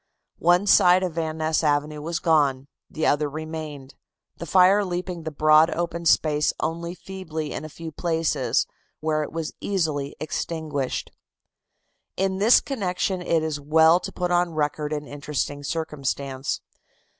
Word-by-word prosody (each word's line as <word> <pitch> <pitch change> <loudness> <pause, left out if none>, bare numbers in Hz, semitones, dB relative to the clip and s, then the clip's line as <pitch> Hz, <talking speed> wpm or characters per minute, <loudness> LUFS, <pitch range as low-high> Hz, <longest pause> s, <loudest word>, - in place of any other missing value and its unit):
One 175 +3 +4
side 180 -2 +6
of 180 -3 -2
Van 160 -1 -3
Ness 160 0 0
Avenue 150 0 0
was 165 +2 -2
gone; 145 -6 +2 0.2
the 155 - -2
other 145 0 +2
remained, 155 -2 -7 0.4
the 170 - -7
fire 190 +5 +5
leaping 180 -1 -4
the 160 - -4
broad 155 +2 +5
open 170 0 -3
space 150 -2 +3
only 170 +2 -3
feebly 165 -5 -6
in - - -5
a 155 - -7
few 165 +1 -8
places, 160 -5 0 0.3
where 155 0 0
it 150 - -4
was 165 -1 -4
easily 155 -8 -1
extinguished. 155 -3 -3 1.1
In 190 0 0
this 220 +4 +6
connection 190 -6 -2
it 165 -2 +1
is 155 -2 -2
well 160 +3 +5
to - - -6
put 180 -1 -2
on 175 -2 +1
record 150 0 -1
an 150 -1 -3
interesting 145 0 -4
circumstance. 140 -3 -3
160 Hz, 145 wpm, -24 LUFS, 150-175 Hz, 1.1 s, side